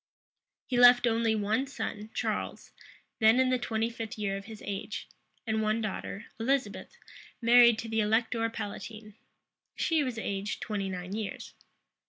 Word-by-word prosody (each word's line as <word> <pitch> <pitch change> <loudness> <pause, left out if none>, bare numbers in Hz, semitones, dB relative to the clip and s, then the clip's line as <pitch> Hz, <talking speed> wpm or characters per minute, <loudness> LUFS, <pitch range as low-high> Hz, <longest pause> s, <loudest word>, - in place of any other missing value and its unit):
He 245 -2 0
left 245 0 +8
only 230 -1 +2
one 220 +6 0
son, 215 -6 -5
Charles, - - -3 0.5
then 220 +3 +5
in 260 0 +3
the 255 - +2
twenty 225 -1 -1
fifth 230 0 -6
year 200 -2 -1
of 195 0 -7
his 220 -1 -10
age; 200 -1 -5 0.4
and 220 -1 0
one 215 +1 +1
daughter, 215 -1 -4
Elizabeth, 270 +4 -1 0.4
married 235 -1 +6
to 230 - -5
the 225 0 -1
elector 225 +2 +1
palatine. 215 0 -7 0.6
She 320 -3 +1
was 255 -4 -3
aged 200 -1 -3
twenty 200 -3 -3
nine 180 0 -5
years. 215 -2 -5
225 Hz, 150 wpm, -29 LUFS, 210-240 Hz, 0.6 s, left